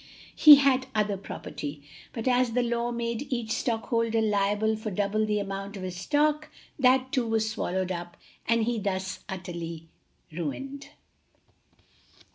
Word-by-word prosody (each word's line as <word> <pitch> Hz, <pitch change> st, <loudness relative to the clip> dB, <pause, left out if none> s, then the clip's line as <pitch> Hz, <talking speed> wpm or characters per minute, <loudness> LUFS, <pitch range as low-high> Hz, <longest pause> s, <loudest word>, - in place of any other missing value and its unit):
He 300 Hz, -1 st, +11 dB
had 270 Hz, -2 st, +2 dB
other 210 Hz, -1 st, +1 dB
property, 150 Hz, -6 st, -7 dB, 0.3 s
but 230 Hz, +1 st, -5 dB
as 250 Hz, -2 st, +2 dB
the 250 Hz, +1 st, +2 dB
law 235 Hz, 0 st, -1 dB
made 235 Hz, +3 st, -3 dB
each 235 Hz, -3 st, -2 dB
stockholder 230 Hz, -1 st, 0 dB
liable 210 Hz, 0 st, +1 dB
for 220 Hz, 0 st, -5 dB
double 205 Hz, +2 st, 0 dB
the 210 Hz, 0 st, +1 dB
amount 200 Hz, 0 st, -4 dB
of 190 Hz, -, -7 dB
his 185 Hz, -1 st, -5 dB
stock, 300 Hz, +9 st, +1 dB, 0.3 s
that 260 Hz, 0 st, +3 dB
too 255 Hz, -4 st, 0 dB
was 225 Hz, -1 st, +1 dB
swallowed 185 Hz, -3 st, -2 dB
up 175 Hz, -1 st, -6 dB, 0.3 s
and 230 Hz, 0 st, +3 dB
he 235 Hz, 0 st, 0 dB
thus 190 Hz, -2 st, -3 dB
utterly 170 Hz, -3 st, -6 dB, 0.4 s
ruined. 265 Hz, -, -5 dB
220 Hz, 140 wpm, -27 LUFS, 190-240 Hz, 0.4 s, He